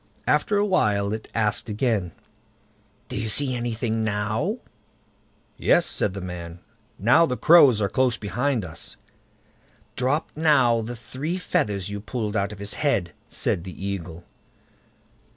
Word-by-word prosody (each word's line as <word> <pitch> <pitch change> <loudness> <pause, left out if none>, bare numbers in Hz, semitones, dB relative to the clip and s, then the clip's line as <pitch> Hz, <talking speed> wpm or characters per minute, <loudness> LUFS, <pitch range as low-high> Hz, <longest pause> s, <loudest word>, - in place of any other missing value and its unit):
After 210 - +2
a 205 - +3
while 105 - +1
it 110 - -5
asked 110 0 0
again: 105 -5 0 1.0
"Do - - -6
you 110 - -2
see 135 +3 +2
anything 115 -2 -2
now?" 105 +1 -1 1.0
"Yes", - - +4
said 95 - 0
the 100 - -5
man; 85 -1 -7 0.4
"now 130 - +5
the 125 - -2
crows 145 -9 +7
are - - +2
close 130 +1 +1
behind 120 +1 -1
us." 80 -1 -8 1.0
"Drop 135 +5 0
now 135 -7 +4
the 120 +2 -5
three 140 +9 -4
feathers 105 - -1
you 100 0 -4
pulled 110 0 -4
out 100 -1 0
of 105 - -8
his 100 +1 -4
head, 105 - 0 0.2
said 85 - -1
the 95 +1 -8
Eagle. 90 -4 -5
110 Hz, 140 wpm, -24 LUFS, 100-130 Hz, 1.0 s, crows